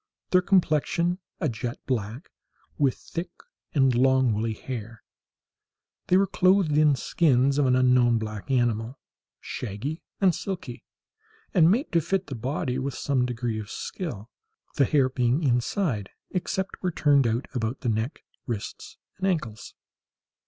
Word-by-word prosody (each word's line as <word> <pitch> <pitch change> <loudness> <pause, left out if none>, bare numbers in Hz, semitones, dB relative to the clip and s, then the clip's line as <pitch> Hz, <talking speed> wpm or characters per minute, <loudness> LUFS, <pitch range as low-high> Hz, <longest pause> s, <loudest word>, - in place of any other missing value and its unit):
Their 185 - +5
complexion 175 -1 +2 0.2
a - - 0
jet 120 -1 -4
black, 120 - -3 0.5
with 135 -4 +3
thick 175 +1 -6 0.5
and 135 -3 +4
long 130 -1 +3
woolly 110 +1 -1
hair. 115 -2 -7 1.0
They 180 - +5
were 195 - +4
clothed 185 -5 +3
in 150 -1 +5
skins 140 -1 +2
of 140 - +3
an 125 - +4
unknown 125 -2 +4
black 110 0 -5
animal, 120 -1 0 0.4
shaggy 125 - -5 0.2
and 190 -3 +4
silky, 190 +2 -5 0.7
and 165 -4 +6
made 240 - +1
to 170 - +3
fit 195 +4 -1
the 140 - -7
body 130 +2 -2
with 135 0 -3
some 130 -3 0
degree 120 -2 -2
of 105 -1 -7
skill, 120 - -6 0.4
the 140 - +3
hair 135 0 +3
being 130 +3 +1
inside, 125 - 0 0.2
except 190 +1 -2
where 185 - 0
turned 145 -5 +3
out 115 +4 -1
about 120 0 -2
the 125 - -1
neck, 110 +5 -2 0.2
wrists, 115 -5 -6 0.2
and 190 - 0
ankles. 130 - -3
130 Hz, 145 wpm, -26 LUFS, 120-165 Hz, 1.0 s, and